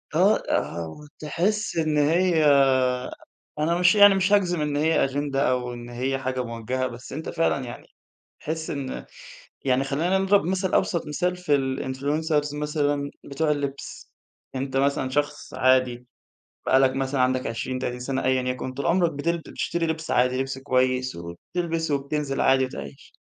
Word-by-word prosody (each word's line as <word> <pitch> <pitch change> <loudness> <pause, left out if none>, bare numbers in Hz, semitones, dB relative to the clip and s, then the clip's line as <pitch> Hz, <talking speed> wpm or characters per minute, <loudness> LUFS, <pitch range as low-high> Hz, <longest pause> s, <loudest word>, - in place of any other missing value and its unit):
آه - - +5
آه 85 -1 -1
وتحس 165 - -3
إن 155 -2 +1
هي 160 +2 +3 1.1
أنا 165 +3 +1
مش 180 +3 +5
يعني 205 -1 +8
مش 190 +1 +2
هاجزم 180 -5 +2
إن 150 -1 -1
هي 160 +2 +3
أجِندة 140 0 0
أو 125 -1 -2
إن 120 0 -8
هي 130 +3 -2
حاجة 130 -1 -2
مُوجَهة، 120 +2 -3
بس 120 +1 -9
أنت 155 +3 -5
فعلًا 165 -5 0
يعني 120 - -9 0.5
تحس 160 +1 -4
إن 140 -2 -4 0.6
يعني 130 0 +2
خلّينا 165 +8 +1
نضرب 195 +1 +3
مَثل 185 +2 -1
أبسط 170 -3 +1
مثال 180 +4 -1
في 180 -5 +1
الinfluncers 145 +3 -1
مثلًا 145 -1 -1
بتوع 150 +2 -1
اللبس، 140 -2 -4 0.4
أنت 135 0 -3
مثلًا 135 -1 +1
شخص 145 +1 -2
عادي 130 -1 +2 0.6
بقى 130 - +5
لّك 135 -1 +4
مثلًا 135 0 -1
عندَك 130 0 +1
20 130 +3 -3
30 125 -1 -4
سنة 130 +1 -2
أيًا 130 0 +2
يكن، 125 0 -3
طول 140 +2 -4
عمرَك 170 -1 +2
بتل 170 +4 -1
بتشتري 170 +1 -3
لِبس 160 0 -3
عادي 125 +1 +2
لِبس 135 0 -3
كويس 130 -3 0
وبتلبس 160 - -4
وبتنزل 140 0 -1
عادي 135 0 +4
وتعيش، 70 - -9
140 Hz, 155 wpm, -25 LUFS, 130-160 Hz, 1.1 s, يعني